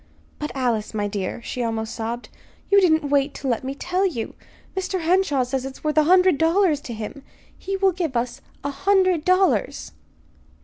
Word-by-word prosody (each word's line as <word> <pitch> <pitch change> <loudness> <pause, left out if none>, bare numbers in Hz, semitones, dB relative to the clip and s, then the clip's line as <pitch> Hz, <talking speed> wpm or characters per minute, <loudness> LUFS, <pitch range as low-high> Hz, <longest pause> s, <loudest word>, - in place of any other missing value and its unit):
"But, 300 - -3
Alice, 235 -5 -1
my 205 -1 0
dear," 200 +3 -4
she 250 - -4
almost 225 -1 -2
sobbed. 235 +2 -4 0.4
"You 400 0 +7
didn't 315 -5 +3
wait 280 0 +2
to 275 - -5
let 240 -2 0
me 265 +1 -4
tell 360 +5 -1
you. 300 - -2 0.4
Mr. 375 -1 -2
Henshaw 330 -5 +2
says 255 +1 -2
it 270 0 -5
is - - -17
worth 305 -1 0
a 305 - +3
hundred 365 -2 +5
dollars 325 -2 +3
to 240 - -7
him. 220 +6 -6 0.3
He 390 0 -4
will 385 0 +3
give 330 -8 -2
us 240 +1 -3 0.2
a 285 - -2
hundred 370 0 +2
dollars." 370 +2 +2
290 Hz, 185 wpm, -23 LUFS, 245-370 Hz, 0.4 s, You